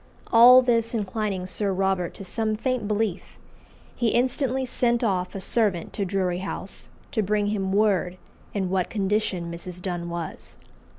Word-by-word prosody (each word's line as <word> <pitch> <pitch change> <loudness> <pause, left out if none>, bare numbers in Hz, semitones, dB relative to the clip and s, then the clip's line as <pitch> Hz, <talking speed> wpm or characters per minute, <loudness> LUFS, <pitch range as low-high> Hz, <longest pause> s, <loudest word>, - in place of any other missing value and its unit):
All 250 +3 +9
this 230 -1 +2
inclining 205 -2 -2
Sir 195 +2 -1
Robert 190 -2 0
to - - -9
some 215 +3 -1
faint 250 -1 -1
belief, 210 -3 -2 0.6
he 240 - 0
instantly 260 +2 +1
sent 240 -1 0
off 185 -4 -1
a - - -3
servant 200 -4 +1
to 200 - -2
Drury 185 -2 -1
House 190 0 -6 0.2
to 220 - +1
bring 210 +1 +1
him 195 -2 -1
word 195 -3 +2 0.3
in 190 -3 -2
what 185 -2 0
condition 195 -4 -1
Mrs. 175 +1 -7
Donne 175 -2 -4
was. 170 -1 -4
200 Hz, 155 wpm, -25 LUFS, 185-225 Hz, 0.6 s, All